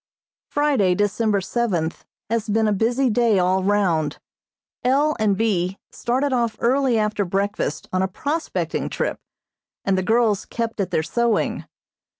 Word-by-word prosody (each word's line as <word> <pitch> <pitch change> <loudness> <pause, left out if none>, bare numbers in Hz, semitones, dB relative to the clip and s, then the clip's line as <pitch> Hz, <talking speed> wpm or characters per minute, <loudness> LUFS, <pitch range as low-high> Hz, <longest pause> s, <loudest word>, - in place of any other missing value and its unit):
Friday, 275 -12 +2
December 205 +1 +1
seventh, 180 -7 -2 0.2
has 225 0 -1
been 220 +1 +2
a 210 - +2
busy 240 +6 +1
day 230 -2 +3
all 185 +1 +2
round. 180 -7 +1 0.7
L. 285 +5 +3
and 205 -3 +2
B. 195 -4 0
started 260 +3 -1
off 235 -3 0
early 255 0 +2
after 210 -1 0
breakfast 195 -3 -2
on 185 - +2
a 190 - +1
prospecting 290 - -2
trip, - - -2 0.7
and 195 - +2
the 185 - +1
girls 220 +1 +2
kept 230 -2 -4
at 195 - 0
their 160 - 0
sewing. 235 +6 0
215 Hz, 145 wpm, -22 LUFS, 190-235 Hz, 0.7 s, day